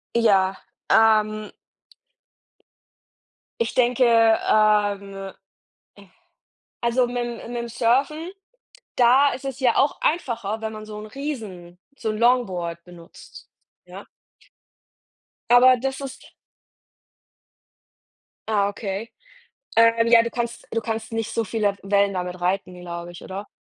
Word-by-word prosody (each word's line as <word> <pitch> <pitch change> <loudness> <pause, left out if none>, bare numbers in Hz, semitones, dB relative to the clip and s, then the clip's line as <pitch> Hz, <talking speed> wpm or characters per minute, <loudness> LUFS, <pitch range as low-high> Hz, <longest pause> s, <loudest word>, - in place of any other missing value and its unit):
Ja, 195 -5 +3 0.3
ähm 215 -1 +3 2.1
ich 230 - -1
denke, 250 0 +2 0.5
ähm 200 -2 +1 1.5
also 240 +1 +2
mit 245 0 -5
'm 235 0 -7
mit 240 -1 -3
'm 235 - -6
Surfen, 275 +9 0 0.6
da 260 +4 +5
ist 265 +2 -8
es 270 -1 -5
ja 245 -3 +2
auch 280 - +2
einfacher, 230 - -1
wenn 220 0 -4
man 215 0 -8
so 210 -1 -9
'n 215 - -8
Riesen 215 -10 -7 0.2
so 225 - -3
'n 215 - -3
Longboard 185 -9 0
benutzt, 175 -2 -15 0.4
ja? - - -11 1.5
Aber 255 +1 +7
das 265 +2 -3
ist 275 -1 -9 2.2
Ah, 205 -2 +2
okay. 200 +1 -5 0.7
Ähm, 230 0 +5
ja, 230 -1 +7
du 235 - -3
kannst 235 -1 -4
du 230 - -1
kannst 225 0 -5
nicht 225 0 -3
so 230 - +1
viele 205 -1 -1
Wellen 200 0 +1
damit 180 0 -4
reiten, 180 0 -2
glaube 170 0 -7
ich, 175 - -12
oder? 195 +2 -7
225 Hz, 120 wpm, -23 LUFS, 195-240 Hz, 2.2 s, Aber